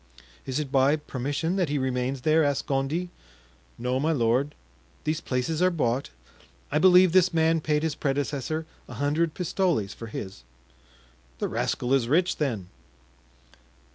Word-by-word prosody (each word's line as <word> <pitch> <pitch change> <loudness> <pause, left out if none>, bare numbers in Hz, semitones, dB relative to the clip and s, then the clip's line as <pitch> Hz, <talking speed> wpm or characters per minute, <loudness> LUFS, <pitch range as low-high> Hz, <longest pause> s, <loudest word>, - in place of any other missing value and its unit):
"Is 130 +2 -1
it 145 -3 -4
by 135 +1 +4
permission 145 +4 -3
that 180 -6 +1
he 145 - 0
remains 130 0 -1
there?" 155 +3 +3
asked 145 -2 0
Gondy. 150 +6 -1 0.7
"No, 125 +2 -1
my 155 +4 +1
lord; 130 +1 +1 0.5
these 155 +2 -1
places 130 +6 -2
are 185 - +5
bought. 135 -6 -1 0.6
I - - +2
believe 185 -1 +6
this 185 +1 +4
man 165 -1 +2
paid 150 0 0
his 160 -2 0
predecessor 145 +2 -2 0.2
a - - -8
hundred 150 +3 0
pistoles 175 - 0
for 115 - -9
his." 95 - -7 0.9
"The - - -1
rascal 125 +2 -1
is 130 -4 +2
rich, 175 +7 +2
then?" 115 - -2
145 Hz, 145 wpm, -26 LUFS, 130-160 Hz, 0.9 s, believe